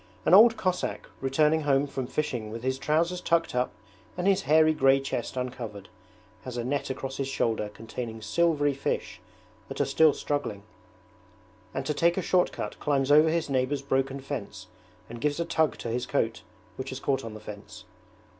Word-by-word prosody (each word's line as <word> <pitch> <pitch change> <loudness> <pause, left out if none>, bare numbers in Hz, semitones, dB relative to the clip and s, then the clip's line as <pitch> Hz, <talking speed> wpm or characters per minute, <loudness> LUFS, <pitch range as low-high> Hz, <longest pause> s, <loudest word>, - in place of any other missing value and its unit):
An - - +3
old 225 +4 +8
Cossack, 185 -1 -2
returning 150 +4 +2
home 140 -1 +2
from 135 -3 -4
fishing 125 -7 -2
with 115 +2 -7
his 130 +1 -1
trousers 165 +5 +1
tucked 165 -1 +1
up 125 0 +1 0.5
and 180 - -2
his 195 0 +3
hairy 155 0 +6
grey 135 -2 +4
chest 135 -1 -4
uncovered, 120 -6 -5 0.5
has 125 -1 -6
a 120 - -2
net 140 +2 -2
across 135 0 -4
his 135 - -2
shoulder 115 -5 -1
containing 115 +1 -7
silvery 145 +5 +1
fish 135 - -3 0.5
that - - -7
are - - +3
still 160 -2 +4
struggling; 130 -9 -3 1.1
and - - -4
to 150 - 0
take 170 +3 +2
a - - +1
short 180 +1 +2
cut - - -6
climbs 140 -1 +1
over 155 +2 +7
his 165 0 0
neighbour's 135 +1 0
broken 135 0 0
fence 135 -5 -6 0.4
and 115 0 -9
gives 150 +2 0
a 170 - 0
tug 160 -2 +1
to 115 - -5
his 120 +2 -2
coat 115 -5 -1 0.4
which 130 - -5
has 130 - -5
caught 135 -1 0
on 110 -1 -7
the - - -8
fence. 105 -1 -10
135 Hz, 185 wpm, -27 LUFS, 125-155 Hz, 1.1 s, old